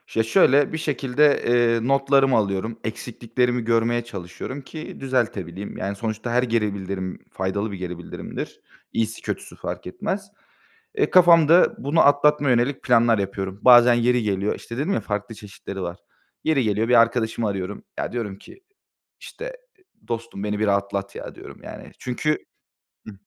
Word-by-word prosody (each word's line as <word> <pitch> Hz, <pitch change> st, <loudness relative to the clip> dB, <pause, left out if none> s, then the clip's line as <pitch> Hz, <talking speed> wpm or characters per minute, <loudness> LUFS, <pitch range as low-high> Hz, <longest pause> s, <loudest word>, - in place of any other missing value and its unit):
Ya 115 Hz, -, +3 dB
şöyle, 135 Hz, +6 st, +4 dB
bir -, -, -1 dB
şekilde, 145 Hz, -1 st, +2 dB
eee, 120 Hz, -1 st, +2 dB
notlarımı 135 Hz, -1 st, +3 dB
alıyorum. 110 Hz, +2 st, -1 dB
Eksikliklerimi 120 Hz, +2 st, -2 dB
görmeye 115 Hz, +1 st, +1 dB
çalışıyorum 100 Hz, +5 st, -7 dB
ki 155 Hz, +4 st, -9 dB
düzeltebileyim. 105 Hz, -8 st, -2 dB
Yani, 100 Hz, +1 st, -3 dB
sonuçta 110 Hz, +2 st, -4 dB
her 125 Hz, +1 st, +2 dB
geri 115 Hz, -4 st, 0 dB
bildirim, 95 Hz, -1 st, -5 dB
faydalı 100 Hz, +3 st, -2 dB
bir 100 Hz, -, -6 dB
geri 90 Hz, -1 st, -5 dB
bildirimdir. 85 Hz, -, -7 dB, 0.3 s
İyisi 115 Hz, 0 st, -2 dB
kötüsü -, -, -5 dB
fark -, -, -6 dB
etmez. 195 Hz, -, -4 dB, 0.7 s
Eee, 420 Hz, -, +2 dB
kafamda 170 Hz, -1 st, +6 dB
bunu 145 Hz, +4 st, +1 dB
atlatmaya 145 Hz, 0 st, +4 dB
yönelik 125 Hz, +3 st, +1 dB
planlar 120 Hz, -3 st, +4 dB
yapıyorum. 95 Hz, 0 st, -4 dB
Bazen 120 Hz, -1 st, +8 dB
yeri 120 Hz, 0 st, +2 dB
geliyor, 100 Hz, -1 st, 0 dB
işte, 115 Hz, -, -9 dB
dedim 155 Hz, +9 st, 0 dB
ya, -, -, 0 dB
farklı 105 Hz, +2 st, -4 dB
çeşitleri 100 Hz, -2 st, -8 dB
var. 90 Hz, 0 st, -5 dB, 0.5 s
Yeri 155 Hz, -5 st, +2 dB
geliyor 110 Hz, +1 st, 0 dB
bir 120 Hz, -1 st, +7 dB
arkadaşımı 115 Hz, -1 st, 0 dB
arıyorum. 100 Hz, 0 st, -4 dB, 0.2 s
Ya, -, -, -3 dB
diyorum 110 Hz, -5 st, -4 dB
ki, 385 Hz, -, -16 dB, 0.6 s
işte, -, -, -8 dB, 0.5 s
"Dostum 115 Hz, -3 st, -5 dB
beni 105 Hz, 0 st, -2 dB
bir 110 Hz, -, +1 dB
rahatlat, 100 Hz, -1 st, -1 dB
ya" -, -, -7 dB
diyorum -, -, -12 dB
yani. -, -, -10 dB
Çünkü. 150 Hz, +5 st, -2 dB, 0.6 s
Hı 110 Hz, -, -8 dB
115 Hz, 150 wpm, -23 LUFS, 100-130 Hz, 0.7 s, Bazen